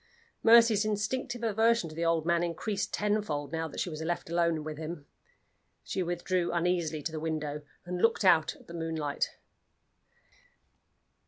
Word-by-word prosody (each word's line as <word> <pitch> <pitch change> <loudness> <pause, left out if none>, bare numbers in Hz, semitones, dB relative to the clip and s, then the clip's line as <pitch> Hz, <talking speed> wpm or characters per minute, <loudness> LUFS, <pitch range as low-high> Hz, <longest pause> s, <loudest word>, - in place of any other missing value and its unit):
Mercy's 230 -2 +6
instinctive 220 +3 -2
aversion 225 -2 +3
to 155 - -9
the 165 +2 -3
old 165 -1 +2
man 170 0 +2
increased 185 +4 -2
tenfold, 205 -9 -1
now 160 0 -2
that 150 - -8
she - - -1
was 155 0 -6
left 165 0 -3
alone 170 -2 +1
with 155 0 -6
him. 160 -2 -6 0.8
She 190 - -2
withdrew 175 0 -1
uneasily 170 -3 0
to 165 - -2
the 160 - -4
window, 155 -2 -3 0.2
and 180 0 -3
looked 225 -2 +3
out 165 -4 +5
at - - -18
the 170 - -11
moonlight. 160 -3 -2
170 Hz, 155 wpm, -30 LUFS, 160-205 Hz, 0.8 s, Mercy's